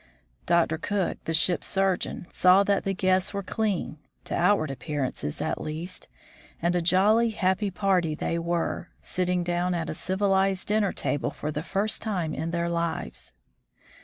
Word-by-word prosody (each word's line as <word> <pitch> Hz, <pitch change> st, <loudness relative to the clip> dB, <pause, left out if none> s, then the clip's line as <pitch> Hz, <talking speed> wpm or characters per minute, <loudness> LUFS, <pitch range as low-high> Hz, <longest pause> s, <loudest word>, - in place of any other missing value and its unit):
Dr. 170 Hz, -2 st, +2 dB
Cook, 200 Hz, +1 st, -2 dB
the 165 Hz, -, -1 dB
ship's 175 Hz, +2 st, +2 dB
surgeon, 190 Hz, -2 st, 0 dB
saw 185 Hz, +2 st, +6 dB
that 200 Hz, 0 st, +1 dB
the 195 Hz, -, 0 dB
guests 185 Hz, +1 st, +1 dB
were 200 Hz, -, -2 dB
clean, 200 Hz, -7 st, -2 dB, 0.2 s
to -, -, -6 dB
outward 175 Hz, -4 st, +2 dB
appearance 135 Hz, 0 st, -3 dB, 0.2 s
at -, -, -2 dB
least, 165 Hz, +4 st, -5 dB, 0.5 s
and 175 Hz, +1 st, +1 dB
a 175 Hz, -, +2 dB
jolly, 205 Hz, +7 st, +4 dB
happy 195 Hz, -1 st, 0 dB
party 185 Hz, -5 st, +1 dB
they 170 Hz, +2 st, -2 dB
were, 170 Hz, +1 st, -2 dB
sitting 180 Hz, -1 st, 0 dB
down 175 Hz, +1 st, 0 dB
at 165 Hz, -, -2 dB
a -, -, -3 dB
civil 190 Hz, +4 st, 0 dB
ized 190 Hz, -1 st, +1 dB
dinner 210 Hz, -2 st, +2 dB
table 145 Hz, 0 st, -1 dB
for 150 Hz, -, -5 dB
the 150 Hz, 0 st, -3 dB
first 200 Hz, +6 st, -1 dB
time 180 Hz, -8 st, -2 dB
in 165 Hz, -, -3 dB
their 170 Hz, 0 st, -1 dB
lives. 170 Hz, -, -3 dB
180 Hz, 160 wpm, -26 LUFS, 165-195 Hz, 0.5 s, saw